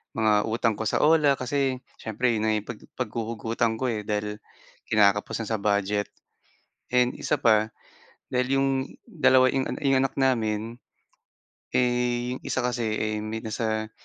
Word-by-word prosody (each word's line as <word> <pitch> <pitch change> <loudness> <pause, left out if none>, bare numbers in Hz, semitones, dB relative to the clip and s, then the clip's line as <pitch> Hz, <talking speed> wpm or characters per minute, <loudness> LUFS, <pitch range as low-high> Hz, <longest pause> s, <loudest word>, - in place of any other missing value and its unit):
mga 110 -1 +3
utang 115 0 +1
ko 110 - -1
sa - - +1
OLA 150 -3 +5
kasi 130 -1 -1 0.2
siyempre 115 +3 0
'yon 110 -2 -1
na 110 - +2
'yong 105 -1 -4
pag 105 - -11 0.2
paghuhugutan 115 -1 -2
ko, 125 +1 -1
eh, 110 - -2
dahil 105 0 -2 0.5
kinakapos 105 +1 +2
na - - -7
sa 110 - 0
budget 105 0 0 0.8
and 125 0 +2
1 150 - -1
pa 110 -3 +3 0.6
dahil 125 +2 +1
'yong 135 0 +2 0.4
2 130 - +4
'yong 135 -1 0 0.2
'yong 135 -1 +4
anak 135 - -2
namin, 115 -3 0 0.9
eh, 125 0 0
yung - - -7
1 125 -1 -2
kasi, 115 -3 -1
eh, 110 0 -1
may 110 +1 -4
nasa, 110 0 -2
115 Hz, 155 wpm, -26 LUFS, 110-130 Hz, 0.9 s, OLA